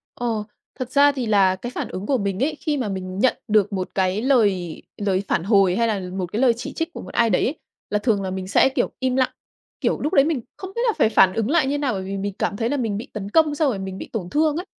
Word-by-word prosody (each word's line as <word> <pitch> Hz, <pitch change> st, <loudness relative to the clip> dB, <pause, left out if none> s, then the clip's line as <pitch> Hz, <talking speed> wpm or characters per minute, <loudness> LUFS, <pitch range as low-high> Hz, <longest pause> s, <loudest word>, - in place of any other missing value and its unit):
Ồ, 225 Hz, -3 st, -2 dB, 0.3 s
thật 255 Hz, 0 st, -4 dB
ra 285 Hz, 0 st, +5 dB
thì 260 Hz, -4 st, -3 dB
là 195 Hz, -3 st, +4 dB
cái 240 Hz, +6 st, -7 dB
phản -, -, -3 dB
ứng 185 Hz, +2 st, -5 dB
của 270 Hz, +1 st, +2 dB
mình 200 Hz, +2 st, -1 dB
ấy, 305 Hz, +1 st, 0 dB
khi 295 Hz, -2 st, -1 dB
mà 235 Hz, -6 st, -2 dB
mình 185 Hz, 0 st, -5 dB
nhận 260 Hz, -, +3 dB
được 210 Hz, -1 st, +2 dB
một 185 Hz, -1 st, -2 dB
cái 190 Hz, +2 st, +1 dB
lời 200 Hz, -, +1 dB, 0.2 s
lời 195 Hz, -1 st, 0 dB
phản 165 Hz, -, 0 dB
hồi 195 Hz, -3 st, +4 dB
hay 230 Hz, +1 st, +2 dB
là 210 Hz, -3 st, 0 dB, 0.2 s
một 185 Hz, -, -1 dB
cái 225 Hz, -, 0 dB
lời 245 Hz, -3 st, +5 dB
chỉ 235 Hz, -, -7 dB
trích 325 Hz, +1 st, -3 dB
của -, -, -7 dB
một -, -, -10 dB
ai 230 Hz, -1 st, +3 dB
đấy 180 Hz, -, +2 dB
ấy, 285 Hz, -, -1 dB, 0.3 s
là 210 Hz, -, +1 dB
thường 210 Hz, -3 st, +1 dB
là 190 Hz, -, -3 dB
mình 190 Hz, 0 st, -4 dB
sẽ, 265 Hz, -, +4 dB
kiểu, 260 Hz, -2 st, -1 dB
im 260 Hz, -1 st, 0 dB
lặng. 260 Hz, -1 st, +2 dB, 0.5 s
Kiểu, -, -, +1 dB
lúc 300 Hz, -, -1 dB
đấy 275 Hz, -, +6 dB
mình 305 Hz, -7 st, 0 dB, 0.2 s
không 380 Hz, 0 st, -7 dB
biết 470 Hz, -, -1 dB
là 445 Hz, -, +3 dB
phải 220 Hz, -, +4 dB
phản 190 Hz, -4 st, +5 dB
ứng 225 Hz, +2 st, -1 dB
lại 310 Hz, -4 st, +3 dB
như 290 Hz, +1 st, 0 dB
nào 275 Hz, -5 st, 0 dB
bởi 190 Hz, -1 st, -3 dB
vì 195 Hz, +1 st, -4 dB
mình 200 Hz, 0 st, -3 dB
cảm 200 Hz, -, -1 dB
thấy 230 Hz, 0 st, 0 dB
là 290 Hz, -, 0 dB
mình 220 Hz, -5 st, -1 dB
bị 225 Hz, -, -6 dB
tấn 205 Hz, -2 st, -5 dB
công 310 Hz, +2 st, +3 dB
xong 295 Hz, -2 st, +2 dB
rồi 200 Hz, -6 st, -2 dB
mình 190 Hz, 0 st, -5 dB
bị -, -, -8 dB
tổn 180 Hz, -5 st, -3 dB
thương 305 Hz, 0 st, +2 dB
ấy. 360 Hz, -, -4 dB
220 Hz, 290 wpm, -22 LUFS, 195-270 Hz, 0.5 s, đấy